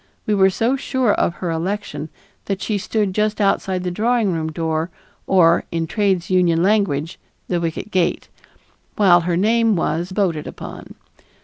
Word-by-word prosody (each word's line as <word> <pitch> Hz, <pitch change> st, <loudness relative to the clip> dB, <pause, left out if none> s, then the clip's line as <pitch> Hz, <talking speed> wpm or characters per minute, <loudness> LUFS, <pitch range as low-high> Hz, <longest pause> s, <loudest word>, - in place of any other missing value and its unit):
We 210 Hz, -, +1 dB
were 190 Hz, -1 st, +5 dB
so 230 Hz, +7 st, 0 dB
sure 260 Hz, -4 st, 0 dB
of 170 Hz, -, 0 dB
her 175 Hz, -3 st, -3 dB
election 165 Hz, -2 st, -3 dB, 0.4 s
that 195 Hz, -1 st, -2 dB
she 205 Hz, +2 st, -2 dB
stood 205 Hz, -1 st, -1 dB
just 215 Hz, +2 st, 0 dB
outside 195 Hz, -2 st, +1 dB
of -, -, -7 dB
the 180 Hz, -, -2 dB
drawing 220 Hz, 0 st, +1 dB
room 160 Hz, -1 st, -2 dB
door, 160 Hz, +1 st, -2 dB, 0.4 s
or, 170 Hz, -3 st, +4 dB
in 165 Hz, -1 st, -1 dB
trades 190 Hz, -1 st, 0 dB
union 175 Hz, -2 st, +3 dB
language, 185 Hz, -6 st, +1 dB, 0.3 s
"the 175 Hz, -2 st, -1 dB
wicket 165 Hz, +5 st, -4 dB
gate," 180 Hz, -2 st, 0 dB, 0.7 s
while 180 Hz, -4 st, +5 dB
her 170 Hz, 0 st, -1 dB
name 225 Hz, +2 st, +3 dB
was 170 Hz, +1 st, -1 dB
voted 185 Hz, -6 st, -1 dB
upon. -, -, -9 dB
185 Hz, 165 wpm, -20 LUFS, 170-210 Hz, 0.7 s, were